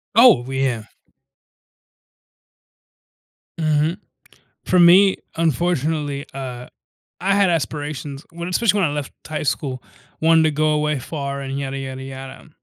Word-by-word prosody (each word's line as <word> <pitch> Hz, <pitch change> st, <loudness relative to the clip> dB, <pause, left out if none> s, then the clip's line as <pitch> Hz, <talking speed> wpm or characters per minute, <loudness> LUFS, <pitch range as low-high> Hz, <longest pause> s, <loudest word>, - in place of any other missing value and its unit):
Oh, 230 Hz, -, +7 dB
w 135 Hz, +2 st, -7 dB
yeah. 130 Hz, -4 st, 0 dB, 2.8 s
Mhm. 155 Hz, +1 st, +1 dB, 0.7 s
For 180 Hz, -, +3 dB
me, 185 Hz, +3 st, +7 dB, 0.2 s
unfortunately, 155 Hz, -3 st, 0 dB
uh, 125 Hz, -2 st, -6 dB, 0.5 s
I 195 Hz, +2 st, +2 dB
had 200 Hz, -2 st, +3 dB
aspirations 145 Hz, -1 st, -3 dB
when 170 Hz, 0 st, -6 dB
especially 205 Hz, +2 st, +2 dB
when 165 Hz, -6 st, +2 dB
I -, -, -4 dB
left 145 Hz, -2 st, -4 dB
high 155 Hz, -1 st, -4 dB
school, 130 Hz, -3 st, -2 dB, 0.4 s
wanted 160 Hz, 0 st, +5 dB
to 155 Hz, -, +3 dB
go 155 Hz, +1 st, +1 dB
away 150 Hz, -1 st, +1 dB
far 140 Hz, +1 st, -5 dB
and 135 Hz, 0 st, -4 dB
yada 135 Hz, -1 st, -3 dB
yada 130 Hz, -1 st, -6 dB
yada; 135 Hz, +1 st, -9 dB
150 Hz, 130 wpm, -21 LUFS, 135-165 Hz, 2.8 s, Oh